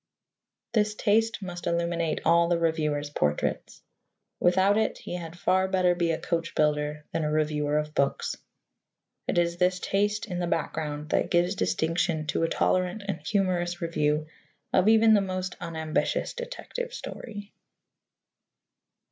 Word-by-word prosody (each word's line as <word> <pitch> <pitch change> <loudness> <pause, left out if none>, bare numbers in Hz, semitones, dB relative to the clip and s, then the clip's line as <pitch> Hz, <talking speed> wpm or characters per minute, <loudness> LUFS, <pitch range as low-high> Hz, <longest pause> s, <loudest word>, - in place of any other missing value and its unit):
This 210 -1 +2
taste 220 0 +1
must 175 -2 -6
illuminate 170 -1 0
all 170 +1 +5
the 175 0 +2
reviewer's 150 -3 0
portraits. 75 - -1 0.6
Without 190 +3 +4
it, 220 0 +1
he - - -7
had 170 -1 -6
far 190 +1 +2
better 185 -2 +3
be 175 -1 0
a 165 - +1
coach 170 0 -2
builder 150 0 0
than 165 - -1
a 150 - 0
reviewer 150 -1 +1
of 150 0 -2
books. 140 -2 0 0.9
It - - 0
is 170 0 +2
this 180 +1 +2
taste 205 +3 0
in 180 -5 -4
the 175 - -1
background 150 -2 -2
that - - +1
gives 175 +1 +2
distinction 165 -3 0
to - - 0
a 165 - +2
tolerant 185 +3 +1
and 200 - -2
humorous 180 -4 0
review 150 -2 0 0.5
of 185 +2 +4
even 220 0 +6
the 205 - +5
most 185 -1 -3
unambitious 160 -2 -1
detective - - -6
story. 205 - -8
175 Hz, 145 wpm, -27 LUFS, 160-195 Hz, 0.9 s, even